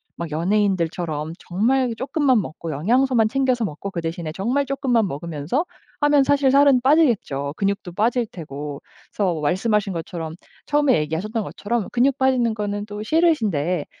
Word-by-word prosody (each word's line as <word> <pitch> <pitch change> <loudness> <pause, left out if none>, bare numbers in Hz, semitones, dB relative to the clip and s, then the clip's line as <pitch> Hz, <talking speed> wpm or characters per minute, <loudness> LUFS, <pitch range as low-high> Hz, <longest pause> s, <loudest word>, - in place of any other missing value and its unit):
막 170 -2 -6
연예인들처럼 170 -3 0
정말 240 +7 +1
쪼끔만 265 -1 +1
먹고 165 -1 -6
영양소만 230 - +2
챙겨서 255 -1 +1
먹고 195 0 -4
그 170 - -4
대신에 165 -1 -4
정말 245 - 0
쪼끔만 255 -5 +1
먹으면서 165 - -3 0.4
하면 290 -1 +5
사실 280 -1 +3
살은 280 -2 +5
빠지겠죠. 235 - +2
근육도 195 -2 -2
빠질 230 +5 +1
테고. 150 -6 -7 0.3
그래서 180 -6 0
말씀하신 195 +6 0
것처럼 165 -1 -5 0.3
처음에 290 -3 +3
얘기하셨던 180 +9 -2
것처럼 220 +2 -3
근육 260 +2 +2
빠지는 255 -4 +2
거는 205 -1 -3
또 210 0 -7
싫으신데 215 - +1
210 Hz, 370 characters per minute, -22 LUFS, 170-260 Hz, 0.4 s, 하면